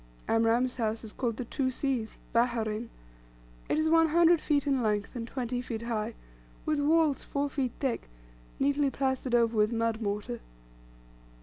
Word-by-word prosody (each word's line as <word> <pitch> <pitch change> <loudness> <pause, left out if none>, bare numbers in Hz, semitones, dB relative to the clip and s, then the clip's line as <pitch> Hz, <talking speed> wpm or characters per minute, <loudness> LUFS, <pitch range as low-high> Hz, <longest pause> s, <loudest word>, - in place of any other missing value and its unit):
Amram's 230 +3 +2
house 225 -1 -1
is 215 - -8
called 235 -4 -2
the 250 - -4
"Two 260 +2 -1
Seas" 255 -4 -2 0.2
"Baherein." 230 -1 +1 0.8
It - - +2
is 310 0 +2
one 325 0 +5
hundred 335 +1 +5
feet 290 -2 +1
in 275 -3 +2
length, 210 -1 -1
and 230 -1 -4
twenty 245 -1 -3
feet 230 -2 -5
high, 230 -1 -2 0.5
with 305 -1 +1
walls 305 -1 +3
four 285 0 -2
feet 260 -4 -1
thick, 260 - -2 0.5
neatly 280 +1 +2
plastered 265 -2 0
over 230 -1 +3
with 215 +1 +3
mud 230 -1 0
mortar. 205 - -3
245 Hz, 160 wpm, -29 LUFS, 225-280 Hz, 0.8 s, one